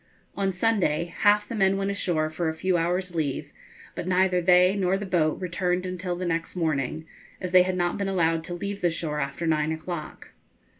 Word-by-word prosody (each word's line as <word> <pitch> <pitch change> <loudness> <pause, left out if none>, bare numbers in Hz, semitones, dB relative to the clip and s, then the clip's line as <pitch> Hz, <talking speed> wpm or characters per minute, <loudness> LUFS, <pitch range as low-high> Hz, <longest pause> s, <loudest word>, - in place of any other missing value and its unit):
On 195 -1 0
Sunday 175 -5 0
half 210 0 +4
the - - -6
men 195 -3 +2
went 195 0 -1
ashore 175 -6 0
for 160 +1 -1
a 160 - -4
few 185 +3 0
hours' 180 +2 0
leave, 150 -5 -2 0.4
but - - -5
neither 185 0 +2
they 180 +2 +5
nor 190 -1 +1
the 205 - -5
boat 165 -5 +1
returned 180 0 -1
until 180 -1 -3
the 180 +1 -4
next 165 0 -2
morning, 155 -2 -1 0.3
as 180 -2 -4
they 185 0 +7
had 185 0 0
not 175 +2 0
been 200 -1 -1
allowed 165 -3 +1
to 175 - -5
leave 200 +3 -5
the 175 - +3
shore 160 -2 -3
after 140 +4 -3
nine 155 -1 +1
o'clock. 160 0 -6
180 Hz, 200 wpm, -26 LUFS, 165-190 Hz, 0.4 s, they